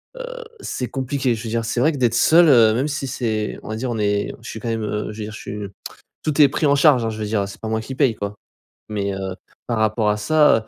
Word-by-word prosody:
heu, - - -7 0.2
c'est 125 - -3
compliqué. 130 0 -1
Je 110 - -7
veux 115 - -4
dire, 115 0 -1
c'est 115 +2 -1
vrai, 155 - +4
que 145 - -5
d'être 120 -3 +2
seul, 165 +8 +6
heu, 115 -6 +6
même 130 +6 0
si 145 -2 -3
c'est, 110 -4 -2
on - - -10
va 110 - -3
dire, 125 +3 -3
on 115 - -2
est 105 -1 0
je 115 - -9
suis 110 - -6
quand 115 - -3
même, 115 -1 -1
heu, 105 0 -3
je 105 - -10
veux - - -3
dire, 110 - -8
je 110 - -8
suis, 105 - -6 0.7
tout 155 -1 0
est 145 - +8
pris 150 +3 0
en 140 - +5
charge 140 -4 +5
hein, 115 - 0
je 110 - -6
veux 105 - -2
dire, 105 -2 0
c'est 100 - -11
pas 110 - -4
moi 110 0 0
qui 130 +4 -7
paye, 130 -3 +2
quoi. 100 0 -4 0.6
Mais 100 -1 -1
heu, 95 -1 -4 0.3
par 115 - -1
rapport 110 0 +2
à 105 - +1
ça, 115 -2 +3
115 Hz, 285 wpm, -21 LUFS, 110-135 Hz, 0.7 s, est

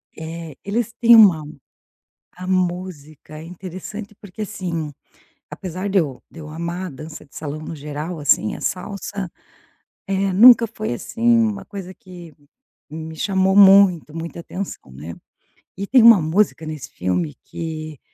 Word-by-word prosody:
É, 160 -2 -8
eles 225 +3 -2
têm 235 0 +6
uma 185 -9 +7 1.0
a 185 - -6
música 175 -5 -3
é - - -9
interessante, 185 +4 -8
porque, 205 +1 -7
assim, 170 -6 -4 0.6
apesar 185 +2 -5
de 195 -1 +3
eu 140 -6 -3
de 165 - -13
eu 150 -1 -9
amar 170 +3 -4
a - - -7
dança 155 +3 -10
de 140 - -29
salão 150 0 -5
no 165 - -7
geral, 150 +3 -6
assim, 140 -6 +2
a - - -10
salsa, 190 0 -4 0.8
eh, 195 -1 0
nunca 235 +3 +8
foi, 215 - -4
assim, 230 - -8 0.2
uma 215 -4 0
coisa 190 -2 -8
que 175 -4 -13 0.6
me 160 +1 -7
chamou 190 +2 +1
muita, 195 -5 +6
muita 165 +1 -7
atenção, 185 - -7
né. 75 +6 -9 0.6
E 200 +2 -5
tem 250 0 +5
uma 230 -5 +8
música 160 0 0
nesse 150 -3 -7
filme 90 -4 -2
que 155 -3 -6
175 Hz, 150 wpm, -21 LUFS, 155-195 Hz, 1.0 s, nunca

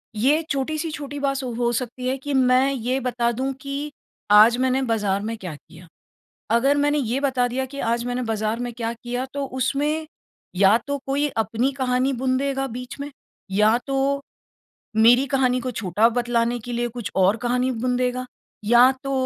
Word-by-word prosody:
ये 280 +9 +3
छोटी-सी 310 +4 -2
छोटी 290 -1 -6
बात 275 -1 -1
हो 240 -1 -1
सकती 250 +1 -3
है 265 +1 0
कि 285 +2 -5
मैं 260 +1 +4
ये 255 +1 -1
बता 240 -2 0
दूँ 260 +3 -2
कि 285 +2 -4 0.4
आज 220 +3 +7
मैंने 260 +1 +1
बाज़ार 200 -3 0
में 225 +1 -4
क्या 180 -7 -7
किया। 165 +4 -16 0.7
अगर 275 +4 +3
मैंने 290 +1 +2
ये 255 0 -1
बता 260 -3 +1
दिया 260 +2 -2
कि 280 +2 -9
आज 235 0 0
मैंने 245 +1 -2
बाज़ार 215 +2 -1
में 245 0 -3
क्या 230 -1 -3
किया, 245 +2 -4
तो 280 -1 -2
उसमें, 285 +5 -1 0.5
या 200 +4 +5
तो 285 0 -1
कोई 285 +2 +1 0.2
अपनी 245 +5 0
कहानी 255 +1 +1
बुन 255 +1 0
देगा 270 0 -1
बीच 250 +3 -8
में, 285 +1 -5 0.4
या 210 +4 +4
तो 275 +1 0 0.8
मेरी 240 +4 +6
कहानी 255 -2 +1
को 255 +1 -3
छोटा 215 0 +2
बतलाने 240 0 0
के 245 - -6
लिए 240 0 -1
कुछ 230 -3 -6
और 190 +3 +4
कहानी 250 +1 +1
बुन 250 +1 -1
देगा, 250 0 -1 0.4
या 240 +4 +6
तो 275 - -2
250 Hz, 180 wpm, -23 LUFS, 235-270 Hz, 0.8 s, आज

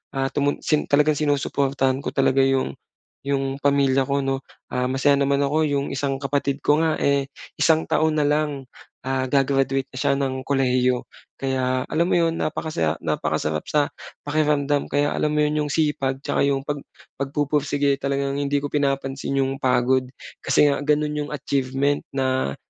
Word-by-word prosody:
ah, 135 0 0
tumun 145 0 +1
sin 150 -1 +1
talagang 150 +1 +3
sinusuportahan 140 -2 0
ko - - 0
talaga 135 -1 +3
yung 135 - +1 0.5
'yong 135 -1 -1
pamilya 140 -2 +2
ko 140 0 0
'no. 135 0 -1 0.3
Ah, 125 0 0
masaya 140 +2 +2
naman 140 0 +2
ako, 155 +2 +1
'yong 140 -1 -1
isang 135 0 -1
kapatid 140 0 -1
ko 150 +1 +3
nga, 160 -1 +2
eh, 140 -1 +2 0.3
1 160 0 +4
taon 155 0 +2
na 150 - +3
lang, 150 -1 0 0.4
ah, 130 0 -1
ga-graduate 135 0 +1
na 130 - -10
siya - - +2
ng 130 -1 -3
kolehiyo. 125 -2 +2 0.3
Kaya 130 -1 -1
alam 170 +2 +2
mo - - +2
'yon 165 -1 +1
napakasaya 120 - -1
napakasarap 75 0 -1
sa 150 -1 +1 0.3
pakiramdam 145 -1 +1
kaya 145 +1 +1
alam 150 - 0
mo 150 - +3
'yon 150 0 0
'yong 145 - -4
sipag, 135 -4 0
'tsaka - - -1
'yong 135 -1 0
pag 145 0 -3 0.4
pagpupursige, 145 0 0
talagang 140 0 -1
hindi 145 0 0
ko 145 - -2
pinapansin 140 -1 -1
'yong 135 0 -3
pagod, 130 0 +2 0.3
kasi 150 - +3
nga 140 - -1
gano'n 150 +1 0
'yong - - -10
achievement 140 0 0 0.2
na 130 - 0
140 Hz, 165 wpm, -23 LUFS, 135-145 Hz, 0.5 s, 1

